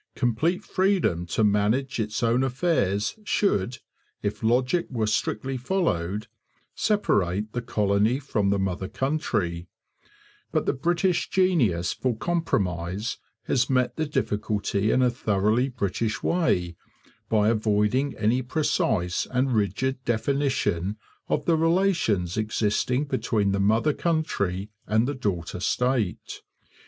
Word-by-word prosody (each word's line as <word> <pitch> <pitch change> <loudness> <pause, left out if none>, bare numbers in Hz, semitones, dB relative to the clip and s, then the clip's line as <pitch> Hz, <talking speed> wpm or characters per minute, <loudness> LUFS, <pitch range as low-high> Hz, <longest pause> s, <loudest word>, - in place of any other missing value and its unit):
Complete 150 +10 0
freedom 185 - +1
to 110 - 0
manage 110 +6 +1
its 105 0 -2
own 120 +3 +3
affairs 125 - 0
should, 125 - 0 0.5
if 100 - -2
logic 125 +9 +2
were 115 -4 -1
strictly 110 +4 -1
followed, 110 - -1 0.5
separate 105 - 0
the 120 - -2
colony 105 0 +1
from 110 -8 -1
the 100 - +2
mother 95 -1 -2
country; 95 - -2 0.8
but - - 0
the - - +1
British 175 +5 0
genius 130 - +2
for 125 -4 -2
compromise 100 - -1 0.2
has 125 -1 +1
met 125 -2 +1
the 155 - -1
difficulty 105 -6 -1
in 130 - +3
a 125 - +3
thoroughly 110 +2 +1
British 110 -1 -2
way 90 - +1 0.5
by 105 -1 +3
avoiding 110 +5 +1
any 110 +4 +2
precise 110 - 0
and 130 0 +1
rigid 125 +6 0
definition 115 -6 0 0.3
of - - 0
the 165 - +3
relations 165 - +1
existing 110 +5 0
between 110 -7 0
the 100 - 0
mother 110 +9 +3
country 105 - -1 0.2
and 110 +3 +2
the 145 - -1
daughter 95 - -3
state. 125 0 -1
115 Hz, 120 wpm, -25 LUFS, 100-135 Hz, 0.8 s, own